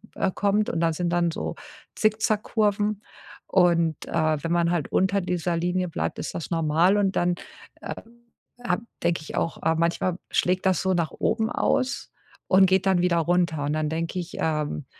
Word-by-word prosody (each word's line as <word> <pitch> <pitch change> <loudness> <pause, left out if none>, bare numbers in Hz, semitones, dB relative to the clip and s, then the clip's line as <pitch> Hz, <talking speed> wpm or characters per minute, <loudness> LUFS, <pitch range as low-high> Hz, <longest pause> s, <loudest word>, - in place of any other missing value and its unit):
äh, - - 0
kommt 205 +1 +1
und 165 - -2
da 165 -1 +2
sind 175 +2 -1
dann 170 0 +1
so - - -4 0.4
Zickzack-Kurven 215 -1 +1 0.4
und, 170 -4 +2
äh, 155 -1 +1
wenn 165 - -2
man 170 0 +2
halt 170 -4 -1
unter 190 +2 +2
dieser 175 -1 -1
Linie 180 +2 0
bleibt, - - -3
ist - - -4
das 170 - -5
normal 165 +3 +3
und 195 -2 +1
dann, 175 0 +2 0.5
äh, - - -5 0.7
habe 180 +2 0 0.2
denke 170 -2 +1
ich 155 - -8
auch: 165 - -1
„Äh, 160 0 +2
manchmal 170 +2 0
schlägt 185 +1 +1
das 185 -3 +2
so 190 -1 +1
nach 170 -3 0
oben 220 0 0
aus 260 +1 0 0.4
und 190 0 +6
geht 190 0 +2
dann 190 -2 +3
wieder 175 -1 +2
runter.“ 170 -2 +1
Und 145 - -1
dann 155 -1 -1
denke 165 +3 -2
ich, 175 -1 -7
ähm: 150 -2 -1
175 Hz, 180 wpm, -25 LUFS, 165-190 Hz, 0.7 s, und